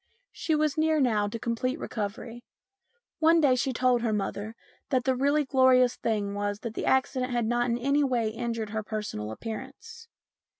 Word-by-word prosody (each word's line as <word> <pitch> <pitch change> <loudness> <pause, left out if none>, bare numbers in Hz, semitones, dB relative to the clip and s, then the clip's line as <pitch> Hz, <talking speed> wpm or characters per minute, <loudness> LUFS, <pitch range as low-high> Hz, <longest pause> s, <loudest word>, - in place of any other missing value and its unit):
She 320 - -1
was 305 0 0
near 315 0 +2
now 220 -6 +2
to 210 - -4
complete 235 +4 -2
recovery. 230 0 -5 0.8
One 330 +1 +5
day 285 -5 +4
she 255 +1 0
told 250 -1 +2
her 230 -2 0
mother 210 +1 -3 0.3
that 255 -2 +1
the 260 0 +1
really 285 +3 +2
glorious 260 -2 +4
thing 205 -3 -2
was 205 0 -3
that 230 -2 -5
the - - -4
accident 260 -1 +1
had 240 -2 0
not 240 +1 +1
in 235 - +1
any 280 +4 +2
way 245 -5 +1
injured 225 -1 -4
her 220 0 -2
personal 210 - -5
appearance. 270 - -8
245 Hz, 175 wpm, -27 LUFS, 220-265 Hz, 0.8 s, One